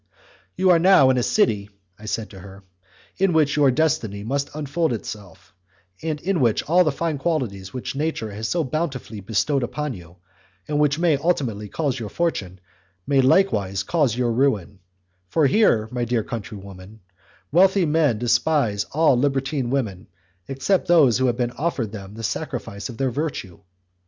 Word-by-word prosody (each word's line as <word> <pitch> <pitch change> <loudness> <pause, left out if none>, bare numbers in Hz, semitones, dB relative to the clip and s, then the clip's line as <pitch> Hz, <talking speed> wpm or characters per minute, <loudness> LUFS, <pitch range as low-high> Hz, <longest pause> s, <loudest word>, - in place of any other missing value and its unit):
"You 185 0 +3
are 170 - +5
now 165 -7 +6
in 130 - +1
a - - +1
city," 105 - +1 0.3
I 105 - -12
said 110 0 -3
to 95 - -11
her, 100 +1 -12 0.6
"in 190 -2 +3
which 155 -3 +2
your 145 -2 +4
destiny 120 -8 0
must 140 +5 -2
unfold 155 0 -1
itself, 100 -6 -8 0.5
and 155 -2 -3
in 190 -2 0
which 115 -5 +2
all 175 +4 +5
the 155 - +1
fine 155 0 -2
qualities 120 - -2
which 130 +1 -5
nature 145 -7 -2
has 110 +2 -4
so 170 +4 0
bountifully 135 -6 -4
bestowed 110 +8 0
upon 145 +3 -3
you, 90 -4 -12 0.5
and 150 -1 -1
which 145 -1 +2
may 165 -3 +2
ultimately 130 -10 -1
cause 140 -2 -2
your 110 -3 -5
fortune, 100 - -2 0.5
may 140 -2 +3
likewise 105 - +2
cause 135 - +1
your 125 -2 +1
ruin; 110 -7 0 0.5
for 160 -3 +2
here, 135 - +3
my 125 -1 -2
dear 120 -2 0
countrywoman, 100 -2 -9 0.5
wealthy 190 +3 +4
men 150 -6 +2
despise 120 -2 +1
all 155 -2 +4
libertine 135 0 0
women 110 -7 -2 0.4
except 135 +8 0
those 145 -9 +5
who 130 - +2
have 120 0 -1 0.2
offered 140 -9 -1
them 100 -2 -9
the 115 - -8
sacrifice 115 -4 -4
of 120 - -9
their 130 0 0
virtue. 120 - -4
130 Hz, 165 wpm, -22 LUFS, 110-155 Hz, 0.6 s, now